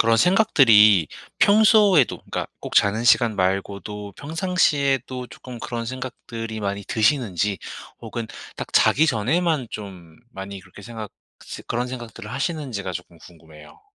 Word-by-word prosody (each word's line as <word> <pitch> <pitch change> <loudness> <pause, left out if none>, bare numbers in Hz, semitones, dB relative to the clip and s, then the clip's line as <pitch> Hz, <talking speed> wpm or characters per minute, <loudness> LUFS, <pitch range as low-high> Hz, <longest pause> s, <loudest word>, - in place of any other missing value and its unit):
그런 115 0 +4
생각들이 115 - +5 0.3
평소에도 205 - +5
그러니까 - - -5
꼭 - - -7
자는 105 +3 +3
시간 120 -2 +4
말고도 100 +2 -2
평상시에도 140 -6 0
조끔 125 -2 -10
그런 115 -1 -5
생각들이 115 -3 -6
많이 100 -1 -3
드시는지 105 - 0 0.4
혹은 115 -2 -6 0.3
딱 - - -6
자기 160 +3 +4
전에만 145 +2 0
좀 90 -6 -9
많이 95 0 -8
그렇게 95 +2 -15
생각 110 -1 -8 0.3
시 - - -8
그런 120 +1 -2
생각들을 115 -3 -8
하시는지가 135 - -3
조끔 85 -2 -9
궁금해요. 80 -3 -16
115 Hz, 325 characters per minute, -22 LUFS, 100-135 Hz, 0.4 s, 생각들이